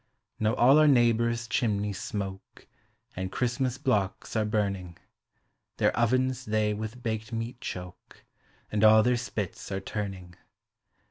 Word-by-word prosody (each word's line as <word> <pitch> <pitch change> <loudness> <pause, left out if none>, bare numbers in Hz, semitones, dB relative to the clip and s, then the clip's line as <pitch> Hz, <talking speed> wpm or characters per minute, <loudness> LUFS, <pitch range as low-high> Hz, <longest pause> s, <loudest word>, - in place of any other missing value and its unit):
Now 110 0 +1
all 135 +5 +6
our 155 - +6
neighbors' 120 -2 +3
chimneys 105 -3 -1
smoke, 95 -2 -6 0.5
And 95 0 -4
Christmas 125 +1 -1
blocks 105 -8 -1
are 110 -1 +2
burning; 100 -5 -2 0.8
Their - - +2
ovens 130 +2 +1
they 105 -1 +1
wilh 110 +3 -6
baked 110 0 -3
meat 115 +2 -4
choke. 90 0 -8 0.5
And 105 0 0
all 110 0 +7
their 125 +1 +3
spits 110 -5 -5
are 95 - -1
turning. 95 -3 -5
110 Hz, 130 wpm, -28 LUFS, 100-120 Hz, 0.8 s, all